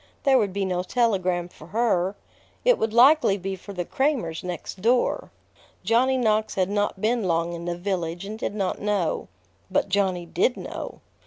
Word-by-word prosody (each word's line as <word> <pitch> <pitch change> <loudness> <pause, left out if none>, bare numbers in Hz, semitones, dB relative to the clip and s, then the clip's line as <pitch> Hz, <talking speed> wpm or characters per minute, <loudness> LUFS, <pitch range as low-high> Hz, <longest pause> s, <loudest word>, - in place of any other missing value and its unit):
There 270 -3 +5
would 205 -4 0
be 195 +1 -1
no 180 -1 0
telegram 185 -5 +1
for 155 -3 -15
her. 195 -2 +1 0.5
It - - +5
would 220 - 0
likely 250 -2 +6
be 195 0 -4
for 190 +2 -11
the 180 -3 -3
Cramers 260 - -1
next 180 +1 -6
door. 240 +4 +1 0.5
Johnny 260 +3 +3
Knox 220 -3 +1
had 190 0 +1
not 205 -1 0
been 225 0 +1
long 170 -1 0
in 170 0 -6
the 175 0 -2
village, 175 -1 -3
and 215 +2 -6
did 205 - -3
not 195 -3 -2
know. 200 -5 0 0.4
But 195 +1 +1
Johnny 190 -3 +1
did 180 +9 +1
know. - - -7
195 Hz, 175 wpm, -25 LUFS, 180-225 Hz, 0.5 s, likely